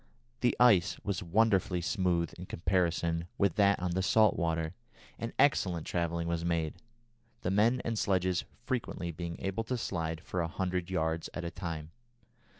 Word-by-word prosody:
The 120 Hz, -, +2 dB
ice 110 Hz, -8 st, +5 dB
was 100 Hz, 0 st, -2 dB
wonderfully 95 Hz, -1 st, +2 dB
smooth 85 Hz, -2 st, 0 dB
in 90 Hz, +1 st, -9 dB
comparison 85 Hz, -1 st, 0 dB
with 100 Hz, -4 st, +3 dB
that 100 Hz, -1 st, +4 dB
on 90 Hz, 0 st, -1 dB
the 95 Hz, +2 st, 0 dB
salt 105 Hz, +1 st, +4 dB
water, 80 Hz, -1 st, -1 dB, 0.5 s
and 115 Hz, 0 st, -3 dB
excellent 90 Hz, -, +2 dB
travelling 85 Hz, -1 st, -1 dB
was 85 Hz, 0 st, -1 dB
made, 85 Hz, -2 st, 0 dB, 0.7 s
the 90 Hz, -, -1 dB
men 115 Hz, +6 st, +3 dB
and 115 Hz, -2 st, -1 dB
sledges 95 Hz, -2 st, +1 dB, 0.2 s
frequently 120 Hz, -9 st, -2 dB
being 85 Hz, +1 st, -5 dB
able 95 Hz, +3 st, -2 dB
to 125 Hz, +2 st, -1 dB
slide 80 Hz, -7 st, -3 dB
for 90 Hz, -, -3 dB
a 85 Hz, -, 0 dB
hundred 90 Hz, +1 st, -2 dB
yards 80 Hz, -2 st, -1 dB
at 85 Hz, -, -4 dB
a 85 Hz, -, -3 dB
time. 80 Hz, -3 st, -5 dB
90 Hz, 160 wpm, -31 LUFS, 85-100 Hz, 0.7 s, ice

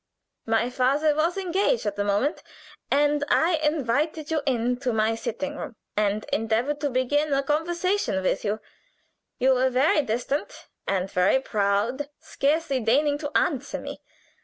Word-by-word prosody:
My 225 Hz, +2 st, +1 dB
father 280 Hz, +4 st, +2 dB
was 330 Hz, +4 st, +1 dB
engaged 390 Hz, +6 st, 0 dB
at 205 Hz, -1 st, -1 dB
the 205 Hz, -, -1 dB
moment, 205 Hz, +10 st, 0 dB, 0.5 s
and 290 Hz, +1 st, +2 dB
I 330 Hz, +1 st, +3 dB
invited 300 Hz, +1 st, 0 dB
you 315 Hz, -2 st, +1 dB
into 250 Hz, 0 st, 0 dB
my 220 Hz, 0 st, +1 dB
sitting 275 Hz, +6 st, -4 dB
room 280 Hz, -6 st, -6 dB, 0.2 s
and 210 Hz, 0 st, 0 dB
endeavored 230 Hz, +7 st, 0 dB
to 290 Hz, -, 0 dB
begin 280 Hz, +4 st, +1 dB
a 275 Hz, -, +1 dB
conversation 335 Hz, -, 0 dB
with 185 Hz, -, 0 dB
you. 210 Hz, 0 st, -1 dB, 0.8 s
You 260 Hz, +1 st, +4 dB
were 260 Hz, +1 st, +2 dB
very 265 Hz, +4 st, +3 dB
distant 245 Hz, +3 st, -3 dB, 0.2 s
and 190 Hz, -1 st, 0 dB
very 180 Hz, +8 st, +3 dB
proud, 220 Hz, +5 st, 0 dB
scarcely 285 Hz, -1 st, 0 dB
deigning 285 Hz, +6 st, +2 dB
to 290 Hz, -1 st, -4 dB
answer 285 Hz, -4 st, -1 dB
me. -, -, -8 dB
270 Hz, 145 wpm, -25 LUFS, 225-300 Hz, 0.8 s, You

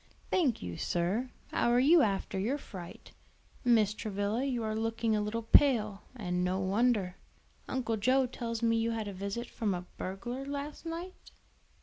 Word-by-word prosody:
"Thank 295 Hz, -, +2 dB
you, 85 Hz, -1 st, -5 dB
sir. 190 Hz, +9 st, 0 dB, 0.2 s
How -, -, +2 dB
are 240 Hz, +1 st, +4 dB
you 310 Hz, +6 st, +6 dB
after 195 Hz, -4 st, 0 dB
your 240 Hz, +9 st, 0 dB
fright? 185 Hz, -11 st, -10 dB, 0.5 s
Mrs. 220 Hz, -4 st, +3 dB
Travilla, 205 Hz, +3 st, -1 dB
you 250 Hz, -4 st, -1 dB
are 215 Hz, 0 st, -1 dB
looking 225 Hz, 0 st, 0 dB
a 210 Hz, -, +1 dB
little 220 Hz, +2 st, -2 dB
pale; 220 Hz, -5 st, +4 dB
and 180 Hz, -6 st, -1 dB
no 185 Hz, +1 st, 0 dB
wonder. 195 Hz, -1 st, +1 dB, 0.5 s
Uncle 230 Hz, -4 st, -1 dB
Joe 255 Hz, +5 st, +3 dB
tells 235 Hz, -2 st, -4 dB
me 230 Hz, 0 st, +3 dB
you 230 Hz, -, +1 dB
had 225 Hz, -2 st, -2 dB
a 200 Hz, -, -5 dB
visit 200 Hz, +5 st, -4 dB
from 210 Hz, -5 st, -1 dB
a 180 Hz, 0 st, -5 dB
burglar 240 Hz, +8 st, -4 dB
last 285 Hz, +3 st, -5 dB
night?" 340 Hz, +3 st, -5 dB
225 Hz, 165 wpm, -31 LUFS, 200-250 Hz, 0.5 s, you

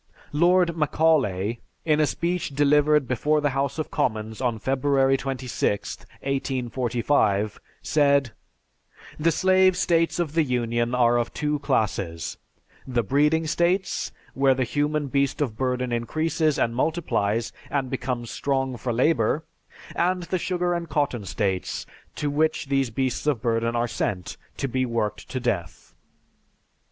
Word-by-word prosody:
Lord 175 Hz, +2 st, +3 dB
Macaulay, 135 Hz, -, +1 dB, 0.3 s
in 155 Hz, -2 st, +3 dB
a 155 Hz, -, +4 dB
speech 170 Hz, -4 st, -2 dB
delivered 150 Hz, 0 st, +4 dB
before 150 Hz, +5 st, +1 dB
the 145 Hz, -1 st, +1 dB
House 135 Hz, +1 st, -1 dB
of 155 Hz, -, -3 dB
Commons 110 Hz, +1 st, -1 dB
on 120 Hz, -3 st, 0 dB
February 135 Hz, +2 st, +2 dB
26, 130 Hz, -6 st, -2 dB
1845, 125 Hz, -5 st, -1 dB, 0.2 s
said: 140 Hz, -4 st, +3 dB, 0.9 s
"The 160 Hz, +2 st, +3 dB
slave 185 Hz, +2 st, +4 dB
states 165 Hz, -1 st, +2 dB
of 170 Hz, -4 st, -1 dB
the 165 Hz, -, +3 dB
Union 120 Hz, -3 st, 0 dB
are 120 Hz, -1 st, +4 dB
of 120 Hz, 0 st, -1 dB
two 150 Hz, 0 st, -1 dB
classes, 100 Hz, -, -1 dB, 0.5 s
the 125 Hz, -3 st, 0 dB
breeding 150 Hz, +8 st, +2 dB
states, 175 Hz, +4 st, 0 dB, 0.2 s
where 135 Hz, -1 st, +3 dB
the 130 Hz, -, +1 dB
human 145 Hz, +4 st, 0 dB
beast 140 Hz, 0 st, 0 dB
of 130 Hz, -7 st, -1 dB
burden 125 Hz, 0 st, -1 dB
increases, 155 Hz, +6 st, 0 dB
and 115 Hz, 0 st, 0 dB
multiplies, 120 Hz, -7 st, 0 dB, 0.2 s
and 135 Hz, -3 st, -1 dB
becomes 125 Hz, -2 st, -3 dB
strong 135 Hz, -2 st, -1 dB
for 120 Hz, +2 st, -3 dB
labor; 150 Hz, +5 st, +2 dB, 0.5 s
and 180 Hz, +1 st, +1 dB
the 185 Hz, +2 st, -2 dB
sugar 180 Hz, 0 st, 0 dB
and 170 Hz, -1 st, -3 dB
cotton 135 Hz, -8 st, -1 dB
states 95 Hz, -1 st, -2 dB, 0.3 s
to 145 Hz, -1 st, -2 dB
which 150 Hz, -1 st, 0 dB
these 135 Hz, -2 st, +1 dB
beasts 130 Hz, +4 st, -2 dB
of 130 Hz, -6 st, +1 dB
burden 115 Hz, 0 st, 0 dB
are 120 Hz, +1 st, +1 dB
sent 90 Hz, -5 st, -3 dB, 0.2 s
to 135 Hz, -, -1 dB
be 130 Hz, 0 st, 0 dB
worked 115 Hz, -4 st, -2 dB
to 130 Hz, -, -3 dB
death. 100 Hz, -9 st, -3 dB
135 Hz, 140 wpm, -25 LUFS, 120-150 Hz, 0.9 s, a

